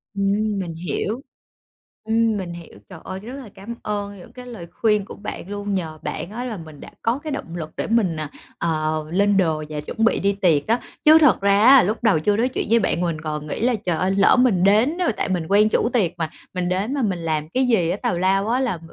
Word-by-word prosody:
Ừm, 200 Hz, +1 st, 0 dB
mình 170 Hz, -3 st, -4 dB
hiểu. 180 Hz, -, -3 dB, 0.8 s
Ừm, 225 Hz, -1 st, +1 dB
mình 180 Hz, -3 st, -5 dB
hiểu. 170 Hz, -1 st, -11 dB
Trời 180 Hz, -4 st, -10 dB
ơi, 190 Hz, 0 st, -6 dB
rất 230 Hz, +6 st, -9 dB
là 265 Hz, -6 st, -9 dB
cám 215 Hz, +5 st, -9 dB
ơn 205 Hz, -1 st, -4 dB
những 180 Hz, -, -14 dB
cái 250 Hz, -1 st, -10 dB
lời 225 Hz, -9 st, -9 dB
khuyên 210 Hz, -3 st, +1 dB
của -, -, -10 dB
bạn 200 Hz, -2 st, -7 dB
luôn, 205 Hz, 0 st, -4 dB
nhờ 160 Hz, -5 st, -3 dB
bạn 170 Hz, +5 st, -5 dB
á 240 Hz, +3 st, -5 dB
là 225 Hz, -5 st, -4 dB
mình 155 Hz, -3 st, -11 dB
đã -, -, -10 dB
có 235 Hz, +4 st, 0 dB
cái 310 Hz, -, -4 dB
động 175 Hz, -12 st, -5 dB
lực 160 Hz, -3 st, -5 dB
để -, -, -2 dB
mình, 220 Hz, -7 st, +1 dB
à, 155 Hz, -2 st, -4 dB, 0.3 s
ờ, 155 Hz, -1 st, -1 dB
lên 200 Hz, +2 st, +3 dB
đồ 160 Hz, -4 st, +1 dB
và 150 Hz, -1 st, -4 dB
chuẩn 150 Hz, +9 st, -4 dB
bị -, -, +2 dB
đi 200 Hz, +1 st, +1 dB
tiệc 170 Hz, -7 st, +2 dB
á. 230 Hz, +2 st, +2 dB, 0.3 s
Chứ 310 Hz, +1 st, +9 dB
thật 295 Hz, -, +4 dB
ra 200 Hz, 0 st, +3 dB
á 270 Hz, 0 st, +8 dB
lúc 215 Hz, +5 st, -2 dB
đầu 205 Hz, -9 st, +4 dB
chưa 205 Hz, +6 st, +1 dB
nói 240 Hz, +3 st, +2 dB
chuyện -, -, -3 dB
với 230 Hz, +1 st, +5 dB
bạn 185 Hz, -4 st, 0 dB
mình 165 Hz, -3 st, -2 dB
còn 150 Hz, -1 st, -4 dB
nghĩ -, -, -4 dB
là 245 Hz, 0 st, +2 dB
"Trời 180 Hz, -6 st, -2 dB
ơi, 185 Hz, +3 st, +1 dB
lỡ 195 Hz, 0 st, +5 dB
mình 220 Hz, -8 st, +3 dB
đến 220 Hz, -, +3 dB
đó" 360 Hz, -, +1 dB
Tại -, -, -1 dB
mình 175 Hz, -4 st, -1 dB
quen 210 Hz, +2 st, +4 dB
chủ 230 Hz, -, +1 dB
tiệc 205 Hz, -9 st, +2 dB
mà, 165 Hz, -2 st, -2 dB, 0.2 s
mình 180 Hz, -1 st, -2 dB
đến 195 Hz, +8 st, -1 dB
mà 285 Hz, -, -1 dB
mình 195 Hz, -7 st, -1 dB
làm 155 Hz, -2 st, -2 dB
cái 260 Hz, +6 st, +1 dB
gì 195 Hz, -9 st, +2 dB
á 185 Hz, -, -1 dB
tào 180 Hz, -, 0 dB
lao 195 Hz, +3 st, +1 dB
á 245 Hz, +3 st, +1 dB
là 240 Hz, -10 st, -1 dB
200 Hz, 255 wpm, -22 LUFS, 170-225 Hz, 0.8 s, Chứ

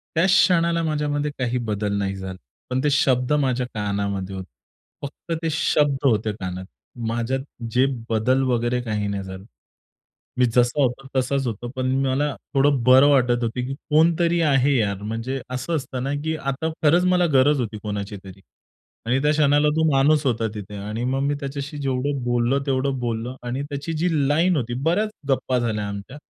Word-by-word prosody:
त्याच 170 Hz, +4 st, +3 dB
क्षणाला 170 Hz, -3 st, +3 dB
माझ्यामध्ये 150 Hz, -2 st, -1 dB
काही 125 Hz, -1 st, 0 dB
बदल 105 Hz, -3 st, -2 dB
नाही 95 Hz, -1 st, -1 dB
झाला. 95 Hz, -1 st, -6 dB, 0.3 s
पण 125 Hz, +1 st, 0 dB
ते 150 Hz, -, +3 dB
शब्द 130 Hz, -2 st, +2 dB
माझ्या 130 Hz, -4 st, +1 dB
कानामध्ये 100 Hz, -2 st, -2 dB
होते. 95 Hz, -1 st, -6 dB, 0.6 s
फक्त 145 Hz, +4 st, -7 dB
ते 165 Hz, -, 0 dB
शब्द 150 Hz, -2 st, +2 dB
होते 110 Hz, -3 st, +2 dB
कानात. 95 Hz, -2 st, -6 dB, 0.4 s
माझ्यात 120 Hz, +3 st, -1 dB, 0.3 s
जे 125 Hz, +3 st, +3 dB, 0.2 s
बदल 125 Hz, +4 st, +2 dB
वगैरे 120 Hz, +1 st, 0 dB
काही 105 Hz, -3 st, -2 dB
नाही 100 Hz, -1 st, -3 dB
झालं. 95 Hz, 0 st, -9 dB, 0.9 s
मी 125 Hz, -, +5 dB
जसा 125 Hz, +3 st, +3 dB
होतो 135 Hz, +1 st, -1 dB
तसाच 135 Hz, +1 st, 0 dB
होतो 120 Hz, +1 st, -4 dB
पण 130 Hz, 0 st, 0 dB, 0.2 s
मला 140 Hz, +2 st, 0 dB, 0.2 s
थोडं 135 Hz, -2 st, +3 dB
बरं 130 Hz, +3 st, +7 dB
वाटत 125 Hz, -4 st, +3 dB
होतं 115 Hz, -, 0 dB, 0.2 s
की 135 Hz, -, -4 dB
'कोणीतरी 165 Hz, +4 st, +2 dB
आहे 140 Hz, +1 st, +3 dB
यार.' 100 Hz, -4 st, -1 dB
म्हणजे 115 Hz, +5 st, -3 dB
असं 130 Hz, +6 st, -2 dB
असतं 130 Hz, -3 st, -4 dB
ना, 135 Hz, +2 st, -2 dB
की 160 Hz, 0 st, -1 dB
आता 140 Hz, +2 st, -2 dB
खरंच 165 Hz, +4 st, +4 dB
मला 180 Hz, -1 st, +3 dB
गरज 135 Hz, +2 st, +4 dB
होती 110 Hz, -3 st, -4 dB
कोणाची 105 Hz, -1 st, -4 dB
तरी 95 Hz, 0 st, -12 dB, 0.7 s
आणि 125 Hz, +3 st, +2 dB
त्या 150 Hz, -, +3 dB
क्षणाला 145 Hz, 0 st, +3 dB
तो 160 Hz, -, +2 dB
माणूस 145 Hz, +2 st, +3 dB
होता 115 Hz, -3 st, +1 dB
तिथे. 105 Hz, -1 st, -7 dB
आणि 105 Hz, +4 st, -4 dB
मग 130 Hz, +2 st, 0 dB
मी 145 Hz, +1 st, +1 dB
त्याच्याशी 140 Hz, +1 st, -5 dB
जेवढं 135 Hz, 0 st, -1 dB
बोललो, 120 Hz, +2 st, +1 dB
तेवढं 135 Hz, 0 st, 0 dB
बोललो 120 Hz, +1 st, -3 dB
आणि 125 Hz, +3 st, -3 dB
त्याची 145 Hz, +2 st, -5 dB
जी 165 Hz, +3 st, 0 dB, 0.2 s
लाईन 165 Hz, +4 st, +3 dB
होती, 120 Hz, -4 st, -2 dB
बऱ्याच 200 Hz, +7 st, +1 dB, 0.2 s
गप्पा 130 Hz, -1 st, +1 dB
झाल्या 110 Hz, -3 st, -1 dB
आमच्या. 100 Hz, +6 st, -7 dB
130 Hz, 175 wpm, -23 LUFS, 115-145 Hz, 0.9 s, बरं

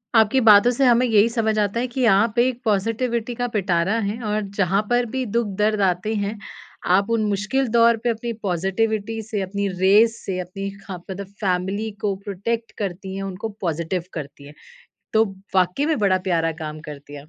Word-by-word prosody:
आपकी 225 Hz, +4 st, +5 dB
बातों 220 Hz, +1 st, +7 dB
से 265 Hz, +3 st, +1 dB
हमें 245 Hz, 0 st, +5 dB
यही 225 Hz, -1 st, +4 dB
समझ 220 Hz, -2 st, 0 dB
आता 205 Hz, +3 st, 0 dB
है 250 Hz, -, -1 dB
कि 250 Hz, +1 st, -1 dB
आप 210 Hz, +4 st, +2 dB
एक 250 Hz, 0 st, +1 dB
पॉज़िटिविटी 225 Hz, +3 st, 0 dB
का 245 Hz, +1 st, -1 dB
पिटारा 190 Hz, +1 st, +1 dB
हैं 215 Hz, +3 st, -3 dB
और 210 Hz, 0 st, -1 dB, 0.2 s
जहाँ 195 Hz, +2 st, +3 dB
पर 245 Hz, 0 st, +2 dB
भी 260 Hz, -, -1 dB
दुख 235 Hz, +1 st, 0 dB
दर्द 210 Hz, 0 st, +1 dB
आते 180 Hz, +5 st, -2 dB
हैं, 205 Hz, +1 st, -2 dB, 0.5 s
आप 195 Hz, +4 st, +3 dB
उन 230 Hz, -2 st, +1 dB
मुश्किल 215 Hz, +7 st, 0 dB
दौर 235 Hz, 0 st, +5 dB
पे 240 Hz, -, +1 dB
अपनी 235 Hz, +1 st, -2 dB
पॉज़िटिविटी 210 Hz, +4 st, -1 dB
से, 215 Hz, -2 st, -4 dB
अपनी 200 Hz, +1 st, -2 dB
रेस 215 Hz, +4 st, +5 dB
से, 185 Hz, -2 st, -2 dB
अपनी 195 Hz, +2 st, -5 dB, 0.2 s
खा 190 Hz, -2 st, -6 dB
मतलब 190 Hz, +2 st, -8 dB
फैमिली 195 Hz, +3 st, -1 dB
को 200 Hz, -2 st, 0 dB
प्रोटेक्ट 225 Hz, +4 st, -3 dB
करती 190 Hz, -1 st, -4 dB
हैं, 195 Hz, -, -4 dB
उनको 195 Hz, +3 st, -5 dB
पॉज़िटिव 170 Hz, 0 st, -2 dB
करती 140 Hz, -2 st, -8 dB
हैं। 145 Hz, -, -12 dB, 0.6 s
तो 220 Hz, 0 st, +5 dB, 0.3 s
वाक़ई 185 Hz, +10 st, +2 dB
में 315 Hz, -5 st, +1 dB
बड़ा 195 Hz, -3 st, +3 dB
प्यारा 165 Hz, -2 st, +1 dB
काम 155 Hz, 0 st, -6 dB
करती 145 Hz, 0 st, -10 dB
है 145 Hz, -, -8 dB
आप, 150 Hz, -, -20 dB
205 Hz, 190 wpm, -22 LUFS, 185-230 Hz, 0.6 s, बातों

